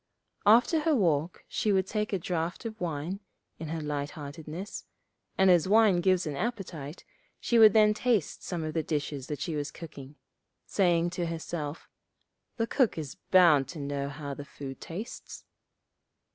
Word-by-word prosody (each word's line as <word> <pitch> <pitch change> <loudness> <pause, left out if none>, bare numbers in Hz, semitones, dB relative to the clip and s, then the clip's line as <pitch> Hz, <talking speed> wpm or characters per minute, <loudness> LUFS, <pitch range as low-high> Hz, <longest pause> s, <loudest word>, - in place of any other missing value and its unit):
After 240 +9 +6
her 310 0 +2
walk 170 - 0
she 215 - 0
would 190 -2 +2
take 210 +1 -2
a 195 - +1
draught 170 +2 -3
of 220 -3 -6
wine, 170 +3 -3 0.4
in 160 - -5
her 160 +1 -3
light 145 -1 -3
heartedness; 155 +6 -7 0.5
and 190 -1 +6
as 175 -1 +4
wine 205 -3 +5
gives 185 0 +2
an 150 -2 -3
appetite, 175 - -5 0.3
she 235 - +2
would 215 -2 +9
then 215 -1 +6
taste 220 -6 0
some 175 -3 -3
of 155 0 -3
the 160 - +1
dishes 145 -3 -3
that 150 -2 -4
she 160 +2 -2
was 145 0 -2
cooking, 145 -4 -10 0.5
saying 175 -3 +2
to 175 -1 -2
herself, 160 -2 -5 0.7
'The 225 - +1
cook 250 -4 +1
is 150 -4 -5 0.2
bound 165 -8 +6
to 155 +2 -8
know 140 -1 -3
how 140 0 -6
the 145 - -7
food 140 -1 -9
tastes.' 200 +8 -7
170 Hz, 165 wpm, -29 LUFS, 150-200 Hz, 0.7 s, would